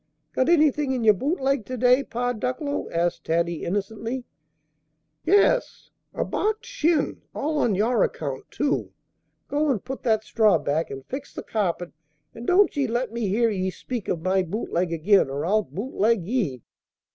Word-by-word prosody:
"Got 260 - +1
anything 300 -4 +3
in 250 -3 -1
your 215 -1 +7
boot 285 - -1
leg 270 -2 +1
to 255 - -4
day, 250 +3 +4
Pa 245 0 -2
Ducklow?" 255 +5 -3
asked 170 +1 -1
Taddy, 170 0 0
innocently. 220 +6 -3 1.0
"Yes, 410 +5 +2 0.2
a - - -2
barked 435 +2 -1
shin! 335 - 0
all 300 +1 -1
on 220 -7 +2
your 220 +3 +2
account, 135 -2 -2
too! 290 -1 -1 0.5
Go 295 +1 +1
and 240 -8 -1
put 265 0 -5
that 220 -3 +1
straw 215 -5 +3
back, 150 +2 -1
and 135 -1 -8
fix 275 +2 -7
the - - -5
carpet; 180 -5 -2 0.4
and 235 +1 -9
don't 380 +1 +4
ye 280 -2 +1
let 240 0 -1
me 235 -3 -1
hear 225 +4 +2
ye 190 -2 -1
speak 235 +3 -6
of 165 -2 -2
my 190 +1 +2
boot 190 +6 -4
leg 175 0 +1
again, 170 0 +3
or 140 +3 -3
I'll 215 +4 +3
boot 215 +5 -6
leg 215 -2 +2
ye!" 180 - -1
230 Hz, 175 wpm, -25 LUFS, 185-270 Hz, 1.0 s, your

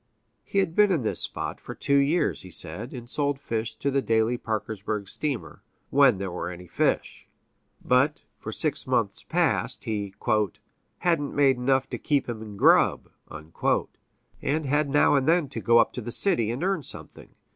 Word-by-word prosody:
He - - -5
had 180 -4 +1
been 210 -1 +5
in 160 -9 +1
this 110 - 0
spot - - -2
for - - -8
two 140 - +1
years, 145 +5 +1
he 95 - -10
said, 95 +8 -4
and 120 -2 -8
sold 140 +1 -1
fish 115 -3 -3
to 140 - -2
the 135 0 +1
daily 115 0 +1
Parkersburg 110 -2 -4
steamer 140 +4 -4 0.3
when 135 -6 +5
there 95 -1 -4
were 90 - -4
any 90 0 -9
fish. 85 - -1 0.6
But, 135 +4 +2 0.2
for - - -6
six - - 0
months - - 0
past, - - 0
he 100 -3 -4 0.8
"hadn't 165 -5 0
made 135 -3 +4
enough 130 +1 +1
to - - -4
keep 145 -2 0
him 115 -3 -5
in 105 -2 -9
grub," - - +4 0.2
and 85 - -4
had 145 +1 +1
now 145 +2 +4
and 135 -2 +2
then 165 -2 +3
to 135 - -5
go 115 0 +4
up - - +3
to 125 - -5
the 120 +1 -6
city 120 - +4
and 120 +8 -3
earn 190 -3 0
something. - - -10
130 Hz, 180 wpm, -26 LUFS, 110-145 Hz, 0.8 s, been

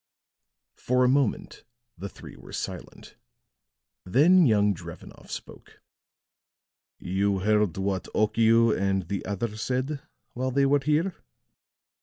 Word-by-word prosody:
For 125 +1 +1
a - - +4
moment 135 -3 0 0.3
the 100 +3 -7
three - - -12
were - - -14
silent; - - -7 0.9
then 160 - +5
young 105 -2 +3
Drevenoff 85 - -11
spoke. - - -10 1.2
"You 95 +1 -1
heard 105 -3 +1
what 95 -1 -2
Okiu 115 +1 +3
and 95 -1 -1
the 100 -1 -3
other 105 +2 -3
said 130 +5 -2 0.3
while 130 +1 -2
they 140 +2 +2
were 140 +1 +3
here?" 155 +6 0
110 Hz, 115 wpm, -26 LUFS, 100-135 Hz, 1.2 s, then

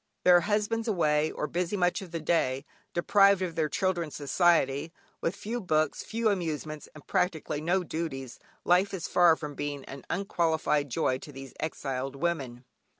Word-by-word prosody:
Their 180 -1 +7
husbands 215 +3 0
away, 155 -6 +2
or - - -3
busy 175 +6 -2
much 180 0 +1
of 190 - -8
the 165 0 -4
day, 145 -4 0 0.3
deprived 195 +2 +4
of 175 -3 -3
their 160 -2 0
children's 175 -3 -1
society, 150 -1 +2 0.3
with 165 - -1
few 235 +4 -4
books, 155 -5 +1
few 225 0 0
amusements, 155 -5 -3
and 155 - -13
practically 160 -4 -1
no 180 +4 +1
duties, 145 -7 -5 0.3
life 185 +3 +3
is 170 - -4
far 175 -2 +5
from 150 -2 -6
being 145 -1 -4
an 135 0 -9
unqualified 160 -6 0
joy 130 +1 0
to 145 - -10
these 135 -1 -10
exiled 135 -3 -3
women. 135 -6 -2
160 Hz, 160 wpm, -29 LUFS, 145-180 Hz, 0.3 s, Their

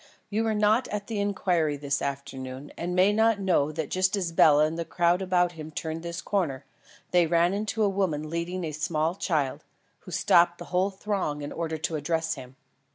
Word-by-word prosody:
"You 220 +2 0
were 220 -1 +1
not 215 +4 +3
at 205 -1 -4
the 220 -1 -3
inquiry 180 -7 0
this 140 0 -1
afternoon, 135 -1 -5
and 175 +1 -3
may 190 +3 +4
not 220 0 +3
know 170 -6 +2
that 160 0 -4
just 185 +1 +2
as 180 -4 -2
Bela 150 -2 +6
and 155 +1 -2
the 170 - -2
crowd 175 +2 +1
about 180 -2 +2
him 155 -2 -8
turned 160 +1 -4
this 170 0 -5
corner, 150 -10 -1 0.5
they 175 -2 +4
ran 170 +2 +3
into 215 +2 -1
a - - +4
woman 185 -6 -1
leading 170 +3 -3
a 160 - -3
small 155 +2 -1
child, 155 -8 -1 0.4
who - - -13
stopped 175 0 +4
the - - -8
whole 185 +2 +3
throng 190 -7 -3
in 145 - -5
order 160 -1 -3
to 155 +1 -2
address 160 +2 -1
him. 130 -2 -10
170 Hz, 200 wpm, -27 LUFS, 155-190 Hz, 0.5 s, Bela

